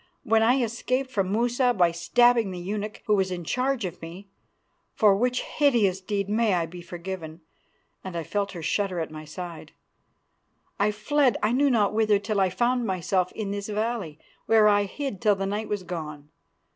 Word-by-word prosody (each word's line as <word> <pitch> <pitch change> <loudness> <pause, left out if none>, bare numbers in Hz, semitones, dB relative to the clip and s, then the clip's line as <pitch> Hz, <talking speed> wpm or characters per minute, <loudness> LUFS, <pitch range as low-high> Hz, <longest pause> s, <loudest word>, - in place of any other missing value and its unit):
When 225 -3 +3
I 245 +3 +3
escaped 255 +3 -2
from 195 -5 -1
Musa 245 +3 +1
by 175 -3 +4
stabbing 230 +6 +3
the 185 - -6
eunuch 205 +4 -5
who 210 - +2
was 190 -2 +2
in 180 -1 -4
charge 255 - -1
of 180 -1 -7
me, 175 +4 -10 0.7
for 210 -3 +5
which 250 +4 0
hideous 225 -10 +2
deed 200 0 -2
may 215 -1 +2
I 170 -1 0
be 175 +2 -10
forgiven," 170 -1 -7 0.6
and 185 -2 -7
I 165 - -3
felt 200 +3 -2
her 170 -3 -7
shudder 185 +3 -1
at 160 -1 -4
my 155 0 -8
side, 170 +1 -8 1.1
"I 200 +1 +3
fled 255 +5 +1
I 210 - +3
knew 280 +3 +3
not 215 -5 +2
whither 215 -1 +3
till 205 0 -2
I 190 - +3
found 245 +6 0
myself 185 0 0
in 205 -3 -4
this 200 +1 -4
valley, 210 -7 -2 0.3
where 220 -1 +5
I 205 -1 +4
hid 265 -2 -5
till 210 -2 +4
the 195 0 -3
night 210 +2 -3
was 205 -2 -2
gone. 150 -4 -7
205 Hz, 185 wpm, -26 LUFS, 180-230 Hz, 1.1 s, for